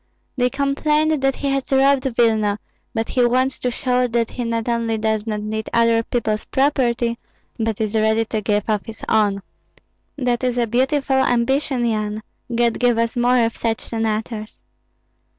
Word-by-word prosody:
They 250 -2 +2
complained 300 +2 +1
that 270 0 +2
he 280 - -2
had 275 0 -2
robbed 270 0 +4
Vilna, 220 -3 +2 0.3
but 225 -2 -2
he 250 - +2
wants 255 +2 +1
to 250 - -1
show 250 0 0
that 235 -1 -1
he 245 - -4
not 230 -1 -2
only 230 -1 0
does 220 0 -1
not 210 -1 -2
need 215 +1 -4
other 230 -1 +4
people's 220 -2 -2
property, 240 -4 +1 0.4
but 225 -2 -1
is 215 -1 -1
ready 220 +1 +2
to 220 -1 -3
give 210 -1 0
of 210 -3 -1
his 225 - -10
own. 200 -2 +2 0.7
That 245 -3 0
is 250 -1 0
a 240 - +2
beautiful 265 +4 +1
ambition, 260 +1 +1
Yan, 215 -1 -2 0.3
God 235 -1 +1
give 245 -2 +3
us 230 0 0
more 245 0 +3
of 225 - -3
such 225 -1 -2
senators." 220 -1 -3
235 Hz, 170 wpm, -21 LUFS, 220-255 Hz, 0.7 s, robbed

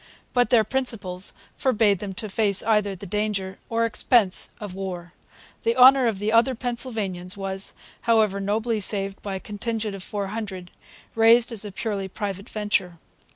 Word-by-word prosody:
But 245 -2 +3
their 235 -3 +5
principles 215 -6 -2 0.2
forbade 215 -6 +2
them 195 -1 -5
to 215 +2 -4
face 200 -1 +2
either 210 -3 +2
the 190 - -10
danger 195 -1 -2
or 230 0 +1
expense 220 -2 +2
of 205 -3 -7
war. 180 -2 -6 0.5
The 230 +2 0
honour 260 0 +8
of 220 -4 0
the 205 +2 -1
other 235 +3 +4
Pennsylvanians 220 -7 -2
was, 195 0 -3 0.3
however, 220 -4 +3
nobly 215 +3 0
saved 195 -1 -1
by 200 -2 -4
a - - -3
contingent 215 +1 -4
of 195 - -7
four 200 0 -4
hundred, 195 -5 -6 0.4
raised 230 +2 +5
as 220 -3 -1
a 205 - -6
purely 200 -1 -3
private 200 +1 -5
venture. 205 -5 -1
210 Hz, 160 wpm, -24 LUFS, 195-230 Hz, 0.5 s, honour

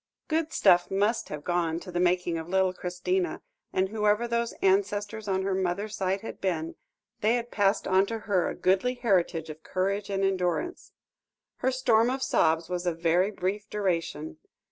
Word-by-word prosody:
Good 320 0 0
stuff 175 - +4
must 205 +4 0
have 150 -1 -6
gone 170 -2 0
to 180 - -9
the 175 - -1
making 180 -1 +1
of 160 +1 -8
little 190 0 +2
Christina, 185 - -2 0.3
and 190 0 +1
whoever 210 +2 +1
those 235 0 -1
ancestors 205 +2 +1
on 190 -1 0
her 195 0 0
mother's 190 +3 -1
side 195 0 -1
had 225 - -8
been, 165 -4 -1 0.5
they 220 +3 +3
had 240 0 -3
passed 200 0 +1
on 190 +1 +3
to 230 - -3
her 200 -5 0
a - - -5
goodly 195 +7 +1
heritage 180 -9 0
of 155 +1 -12
courage 195 +4 -2
and 195 -1 -1
endurance. 195 - -1 0.7
Her 260 - +1
storm 240 -3 +3
of 260 +1 -2
sobs 160 +1 +2
was 180 0 -3
of 165 -1 -1
very 175 +3 +3
brief 205 +1 -3
duration. 165 -6 -2
195 Hz, 175 wpm, -28 LUFS, 180-215 Hz, 0.7 s, stuff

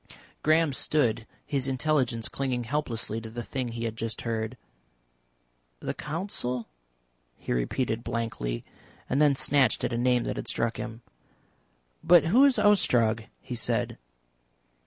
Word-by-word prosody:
Graham 155 -1 +3
stood, 120 -6 0 0.2
his 135 -2 -1
intelligence 130 -4 +1
clinging 130 -3 -2
helplessly 115 -4 -2
to 110 - -8
the 120 +1 -5
thing 130 -1 -3
he 115 0 -5
had 115 -1 -2
just 115 0 -3
heard. 115 +1 -3 1.2
"The - - -3
Council," 150 - -3 0.7
he - - -3
repeated 110 - -1
blankly, 115 - -3 0.4
and 140 - +1
then 145 -2 +5
snatched 135 -3 +2
at - - 0
a 115 - 0
name 125 -1 +3
that - - -3
had - - -4
struck 115 0 0
him. 115 0 -6 1.0
"But 170 -2 +7
who 240 +12 +6
is 275 -3 +4
Ostrog?" 115 - +3 0.2
he - - -7
said. 120 0 -1
120 Hz, 135 wpm, -28 LUFS, 115-145 Hz, 1.2 s, But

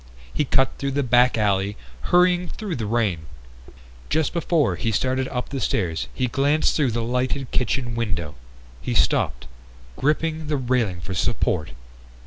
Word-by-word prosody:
He 150 - +1
cut 130 0 +2
through 140 -1 -2
the 140 +1 +1
back 125 0 +4
alley, 100 -1 +1 0.3
hurrying 180 0 +4
through 205 -4 -5
the 115 -6 -3
rain. 100 -9 0 0.8
Just 155 -2 +1
before 165 -4 +1
he 115 - -1
started 130 +4 0
up 125 -2 -4
the 140 - -3
stairs 85 -9 -1
he 130 - -1
glanced 140 +5 +2
through 145 -4 +2
the 115 0 -1
lighted 125 +2 -1
kitchen 125 -1 0
window. 95 -10 -2 0.5
He - - -3
stopped, - - +2 0.5
gripping 155 +1 0
the 150 -1 0
railing 120 -8 0
for 95 - -5
support. 80 -3 0
125 Hz, 150 wpm, -23 LUFS, 110-145 Hz, 0.8 s, back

